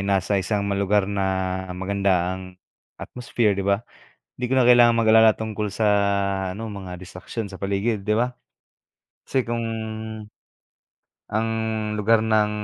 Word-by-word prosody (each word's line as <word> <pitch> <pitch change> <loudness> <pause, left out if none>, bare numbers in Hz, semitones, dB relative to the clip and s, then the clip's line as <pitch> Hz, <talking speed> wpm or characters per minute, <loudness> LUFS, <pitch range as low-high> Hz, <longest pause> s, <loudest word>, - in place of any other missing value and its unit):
nasa 100 0 +1
isang 100 +2 -1
ma 100 - -1
lugar 100 +1 +2
na 95 -2 -1 0.2
maganda 95 -1 0
ang 95 0 -8 0.4
atmosphere, 120 -3 -1
'di 100 - -2
ba? 100 +3 0 0.5
Hindi 125 - -6
ko 130 - +1
na 130 - +5
kailangang 120 -1 +6
mag-alala 110 -1 +5
tungkol 110 -1 -3
sa 105 +2 -1 0.7
ano, 110 0 -6
mga 95 -3 -7
distraksiyon 95 +4 -7
sa 95 - -10
paligid, 100 +3 -1
'di 105 +2 0
ba? 125 +2 +1 0.9
Kasi 130 -2 -1
kung 115 0 -2 1.7
Ang 110 +2 0 0.5
lugar 110 +1 +3
ng 110 -1 +2
100 Hz, 140 wpm, -23 LUFS, 95-110 Hz, 1.7 s, kailangang